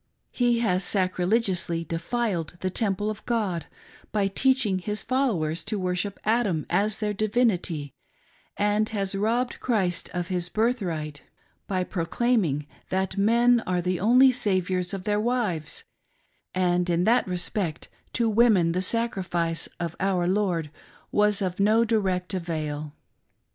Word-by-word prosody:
He 240 -2 +2
has 185 -4 +1
sacrilegiously 185 -2 0
defiled 175 0 -2
the 185 - -1
temple 205 0 0
of 215 - -9
God, 200 -9 -1 0.4
by 205 -2 +1
teaching 220 -2 +2
his 210 +2 -1
followers 205 - 0
to 215 - -2
worship 185 +1 -2
Adam 215 -8 +1
as 200 +4 +2
their 210 -1 -1
divinity, 200 - 0 0.6
and 210 +1 +1
has 200 -3 -2
robbed 230 +5 0
Christ 190 -8 0
of 175 0 -3
his 180 -1 -1
birthright 175 - -1 0.5
by 185 -2 0
proclaiming 175 - 0 0.2
that 190 0 -1
men 235 +4 +4
are 180 -1 +1
the 180 0 -1
only 250 +6 +6
saviours 185 -6 0
of 190 - -6
their 210 +1 +1
wives 215 -10 -1 0.7
and 180 -1 +1
that 180 +8 +3
in - - -4
respect 175 -2 -1 0.3
to 235 -2 +1
women 215 -6 +4
the 180 +2 0
sacrifice 185 -6 0
of 170 -1 -3
our 185 -2 +1
Lord 180 -6 0 0.4
was 210 -1 +3
of 185 0 -3
no 215 +3 +4
direct 190 -6 0
avail. 155 -4 -4
195 Hz, 135 wpm, -26 LUFS, 175-220 Hz, 0.7 s, only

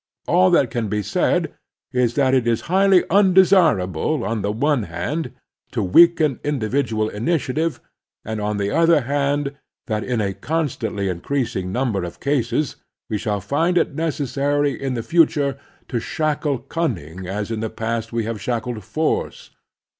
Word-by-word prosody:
All 185 +3 +4
that 140 -9 +3
can 115 -2 -2
be 105 0 -1
said - - 0 0.4
is 125 -2 +1
that 135 -2 +2
it 125 -3 +2
is 115 -1 +1
highly 190 0 +4
tmdesirable, 165 - +3
on 110 -1 -2
the 100 - -1
one 140 +4 +1
hand, 125 - -3 0.4
to 115 -4 0
weaken 155 - +5
individual 120 -5 0
initiative, 150 +7 -1 0.5
and, 110 -1 -4
on 105 0 -1
the 100 0 -1
other 165 -1 +4
hand, 140 +1 -1 0.3
that 110 -2 -2
in 125 -2 -1
a 100 -2 -1
con 160 - -1
stantly 105 -5 -3
increasing 95 0 -2
ntunber 115 -5 -1
of 85 - -7
cases 135 0 0 0.3
we 105 - 0
shall 105 -3 -2
find 165 - +1
it 165 - +1
necessary 145 -2 0
in 135 -1 -3
the 115 - -3
future 145 -4 +2 0.3
to 120 - -2
shackle 150 +2 -1
cunning 100 - -4
as 105 +3 -3
in 110 - -2
the 110 0 -2
past 115 +1 -3
we 115 -1 -1
have 110 -1 -4
shackled 120 -2 -3
force. 155 +11 -2
125 Hz, 155 wpm, -21 LUFS, 110-150 Hz, 0.5 s, weaken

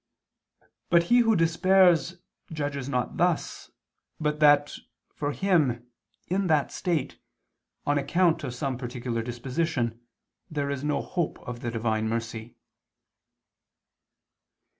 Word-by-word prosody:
But 170 -1 +5
he 245 - +7
who 225 -2 +4
despairs 175 -1 +3 0.3
judges 145 -3 -3
not 125 -3 -2
thus, - - 0 0.5
but 150 -1 -1
that, 145 -1 +5 0.4
for 145 -1 -2
him 145 -10 +1 0.4
in 190 +1 0
that 155 -4 +2
state, 165 -7 -2 0.7
on 145 0 +2
account 165 +3 +2
of 125 - -4
some 130 -1 -3
particular 120 -2 -3
disposition, 120 0 -2 0.5
there 145 -2 -2
is 140 -1 -4
no 150 0 0
hope 175 -4 -2
of 120 -1 -5
the 120 - -3
Divine 110 -1 -1
mercy. 115 0 -4
145 Hz, 115 wpm, -27 LUFS, 120-165 Hz, 0.7 s, he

